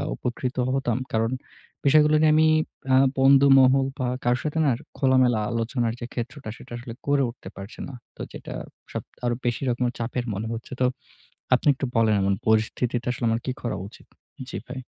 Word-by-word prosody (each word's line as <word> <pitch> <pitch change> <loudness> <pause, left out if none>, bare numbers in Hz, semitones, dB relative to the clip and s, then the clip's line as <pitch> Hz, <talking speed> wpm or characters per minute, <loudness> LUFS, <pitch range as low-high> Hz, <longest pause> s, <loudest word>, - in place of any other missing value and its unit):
উপকৃত 125 - -3 0.2
হতাম। 130 -4 0 0.2
কারণ, 115 +1 +1 0.5
বিষয়গুলো 150 +2 +5
নিয়ে 155 -1 +5
আমি 155 0 +5 0.5
আ - - +7 0.2
বন্ধুমহল 135 -1 +6
বা 130 - 0 0.2
কারো 120 0 +3
সাথে 155 +1 -1
না 140 - +4 0.3
খোলামেলা 130 -4 +3
আলোচনার 115 0 -1
যে 120 - -4
ক্ষেত্রটা, 125 +1 -5
সেটা 125 - -12 0.3
করে 140 -1 +3
উঠতে 120 - -10
পারছে 100 +3 -9
না। 140 - -9 0.2
তো - - -9
যেটা - - -8 0.4
সব, - - -4 0.2
আরো 120 0 +1
বেশি 120 -1 0
রকম 125 +1 0
চাপের 120 +1 -2
মনে 105 +3 -3
হচ্ছে। 115 0 -8
তো - - +5 0.7
আপনি 125 - -2
একটু 135 - -3
বলেন 110 -2 +4 0.3
পরিস্থিতিতে 115 +2 +1
আসলে 120 -1 -3
আমার 115 +1 0
কি 130 - -1
করা 120 - -2
উচিত? 105 - -16 0.4
জি - - -4
ভাই। 135 - -6
125 Hz, 170 wpm, -25 LUFS, 115-135 Hz, 0.7 s, আ